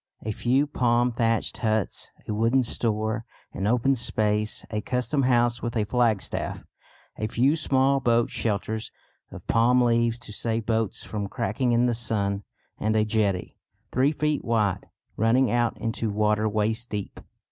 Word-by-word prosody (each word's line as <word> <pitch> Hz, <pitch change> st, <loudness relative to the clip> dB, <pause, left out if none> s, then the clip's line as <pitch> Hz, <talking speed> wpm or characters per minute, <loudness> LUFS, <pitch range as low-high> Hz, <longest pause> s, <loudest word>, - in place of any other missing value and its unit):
A 110 Hz, -, -2 dB
few 130 Hz, +6 st, +1 dB
palm 125 Hz, -3 st, +1 dB
thatched 115 Hz, -1 st, 0 dB
huts, 110 Hz, -4 st, 0 dB, 0.2 s
a -, -, -2 dB
wooden 115 Hz, +5 st, +2 dB
store, 110 Hz, -1 st, -1 dB, 0.3 s
an 95 Hz, -, -2 dB
open 125 Hz, +4 st, +3 dB
space, 110 Hz, -3 st, -1 dB
a 105 Hz, -1 st, -1 dB
custom 125 Hz, +5 st, 0 dB
house 120 Hz, -2 st, +2 dB
with 120 Hz, -1 st, -3 dB
a 110 Hz, -, +2 dB
flagstaff, 115 Hz, -2 st, -1 dB, 0.6 s
a 110 Hz, -, -1 dB
few 130 Hz, +7 st, +2 dB
small 135 Hz, -2 st, +2 dB
boat 120 Hz, -2 st, +2 dB
shelters 110 Hz, 0 st, -2 dB, 0.4 s
of -, -, -11 dB
palm 120 Hz, +2 st, +3 dB
leaves 115 Hz, -1 st, +2 dB
to 120 Hz, -3 st, -9 dB
save 115 Hz, +1 st, -1 dB
boats 110 Hz, -3 st, -1 dB
from 105 Hz, -2 st, -4 dB
cracking 120 Hz, 0 st, -1 dB
in 120 Hz, +1 st, +3 dB
the 120 Hz, -, +2 dB
sun, 100 Hz, -4 st, -1 dB, 0.4 s
and 110 Hz, +1 st, 0 dB
a 110 Hz, 0 st, +3 dB
jetty, 105 Hz, -4 st, -1 dB, 0.3 s
three 130 Hz, +3 st, +3 dB
feet 150 Hz, -1 st, -1 dB
wide, 110 Hz, -5 st, 0 dB, 0.3 s
running 120 Hz, +4 st, +3 dB
out 120 Hz, -1 st, +1 dB
into 115 Hz, 0 st, -2 dB
water 105 Hz, +1 st, +1 dB
waist 110 Hz, +3 st, -1 dB
deep. 105 Hz, -2 st, -5 dB
115 Hz, 155 wpm, -25 LUFS, 110-120 Hz, 0.6 s, open